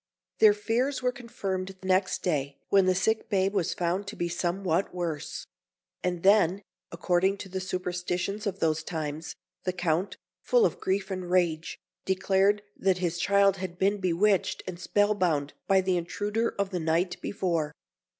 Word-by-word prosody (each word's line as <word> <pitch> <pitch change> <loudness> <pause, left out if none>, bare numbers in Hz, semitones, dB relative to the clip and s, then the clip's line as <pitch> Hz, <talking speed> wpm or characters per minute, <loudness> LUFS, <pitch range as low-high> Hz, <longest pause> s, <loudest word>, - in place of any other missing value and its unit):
Their 210 -2 +7
fears 245 +6 -1
were 250 - +2
confirmed 195 -6 -4
next 185 0 +1
day, 140 -5 -1
when 195 -2 +4
the 185 - +3
sick 220 +4 0
babe 195 -1 +1
was 190 -5 0
found 180 +3 -1
to 210 - -6
be 175 - -2
somewhat 175 +1 -1
worse; 165 -4 -4 0.6
and 180 -2 -2
then, 200 -1 +4 0.3
according 180 +3 +1
to 195 - -8
the 190 +1 -3
superstitions 185 +2 -2
of 195 -1 -2
those 160 -3 +1
times, 160 -1 -5 0.3
the 185 - -1
Count, 175 +2 -1 0.2
full 485 -3 +4
of - - -1
grief 195 +1 -1
and 185 -2 -4
rage, 175 -3 +1 0.3
declared 195 +2 +2
that 190 -1 +1
his 175 -2 -2
child 200 0 +4
had 185 -2 -5
been 200 +2 +2
bewitched 190 +2 +1
and 185 -2 -6
spellbound 180 -9 +1
by 190 -1 +5
the 185 -1 +1
intruder 205 +6 -1
of 200 -1 -1
the 180 - -1
night 170 +3 0
before. 170 -6 -1
185 Hz, 160 wpm, -28 LUFS, 175-200 Hz, 0.6 s, Their